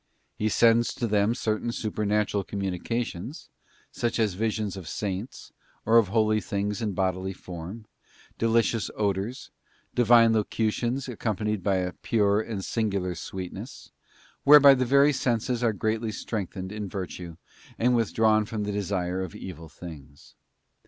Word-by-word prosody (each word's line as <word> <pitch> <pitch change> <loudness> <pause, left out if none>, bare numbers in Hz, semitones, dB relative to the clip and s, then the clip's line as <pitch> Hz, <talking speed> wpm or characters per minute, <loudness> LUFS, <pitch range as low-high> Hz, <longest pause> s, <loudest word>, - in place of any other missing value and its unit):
He 110 - 0
sends 115 +2 +4
to 120 - -2
them 105 +1 +2
certain 110 0 -1
supernatural 105 -2 -1
communications, 100 - -4 0.4
such 120 - -1
as 110 -4 +1
visions 105 0 -2
of 95 -4 -8
Saints 100 +3 -5 0.3
or 115 +1 +6
of 110 - +2
holy 110 +1 +2
things 100 +2 -2
in 105 -3 -1
bodily 95 0 -1
form, 90 +5 -8 0.5
delicious 115 -1 +2
odours, 105 +4 -2 0.4
Divine 115 -1 +6
locutions 115 +4 0
accompanied 105 -3 -2
by 100 +1 +1
a 90 -1 -1
pure 105 -2 +1
and 105 -4 -5
singular 100 -5 -1
sweet 90 +1 -6
ness, - - -9 0.5
whereby 140 -1 +9
the 130 -1 +1
very 140 +3 +5
senses 125 -1 0
are 115 - +3
greatly 110 +2 -1
strengthened 95 -3 -5
in 105 -2 -5
virtue 90 -4 -6 0.4
and 125 +1 +3
withdrawn 110 -1 +3
from 110 -1 -4
the 105 - -2
desire 95 -2 -2
of 95 -3 -6
evil 85 -4 -8
things. 75 -4 -12
105 Hz, 140 wpm, -27 LUFS, 95-115 Hz, 0.5 s, whereby